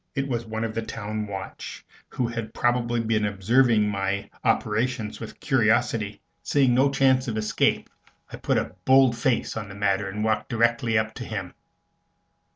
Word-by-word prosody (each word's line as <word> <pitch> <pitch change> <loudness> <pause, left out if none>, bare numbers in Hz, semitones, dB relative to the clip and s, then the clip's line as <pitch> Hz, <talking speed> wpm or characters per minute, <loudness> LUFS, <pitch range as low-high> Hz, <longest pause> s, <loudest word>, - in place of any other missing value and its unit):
It 140 0 -1
was 120 -3 -3
one 110 0 -3
of 115 -1 -3
the 115 - -2
town 110 -1 -4
watch, 95 -1 -7 0.2
who 125 - -1
had 115 -1 -5
probably 120 -1 +1
been 110 -1 0
observing 105 +2 +3
my 100 -1 -2
operations 110 0 0
with - - -9
curiosity. - - +1 0.2
Seeing 135 -4 +2
no 135 +3 +4
chance 135 -1 +3
of 110 -2 -2
escape, 105 0 +1 0.5
I - - -5
put - - 0
a - - -2
bold 130 -2 +5
face 120 +1 0
on 110 -3 -5
the 100 - -9
matter 100 -1 0
and 105 +2 -4
walked 110 -1 0
directly 115 -1 +2
up 110 0 0
to 125 - -7
him. 95 -5 -5
115 Hz, 165 wpm, -25 LUFS, 105-120 Hz, 0.5 s, bold